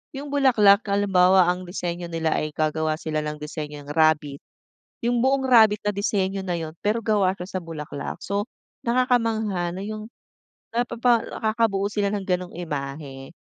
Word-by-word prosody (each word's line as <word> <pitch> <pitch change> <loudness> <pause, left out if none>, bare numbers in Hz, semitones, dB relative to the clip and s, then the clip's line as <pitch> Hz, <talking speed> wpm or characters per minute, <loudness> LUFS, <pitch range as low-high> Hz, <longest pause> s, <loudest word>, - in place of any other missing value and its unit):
yung 280 +1 -6
bulaklak 230 -8 +5
halimbawa 190 -2 +4
ang 180 0 -5
disenyo 175 -1 -4
nila 165 -1 -1
ay 155 0 -2
gagawa 155 0 0
sila 155 -1 -3
ng 150 0 -3
disenyong 150 -1 -7
rabbit. 150 -2 +2 0.7
Yung 240 -1 +2
buong 265 +1 +2
rabbit 220 -4 +6
na 205 - +1
disenyo 195 -1 -1
na 180 -2 -2
yun 160 -1 -6
pero 210 +3 +1
gawa 205 -4 +2
siya 180 - -6
sa 185 - -3
bulaklak 155 -3 -6
so, 200 +1 -1 0.4
nakakamangha 225 -7 +1
na 185 - -6
yung, 215 +1 -6 0.7
napapa 235 -1 +2
nakakabuo 215 -3 0
sila 205 -1 0
ng 205 -2 -2
gano'ng 180 -1 -1
imahe. 140 -3 -6
190 Hz, 150 wpm, -24 LUFS, 160-220 Hz, 0.7 s, rabbit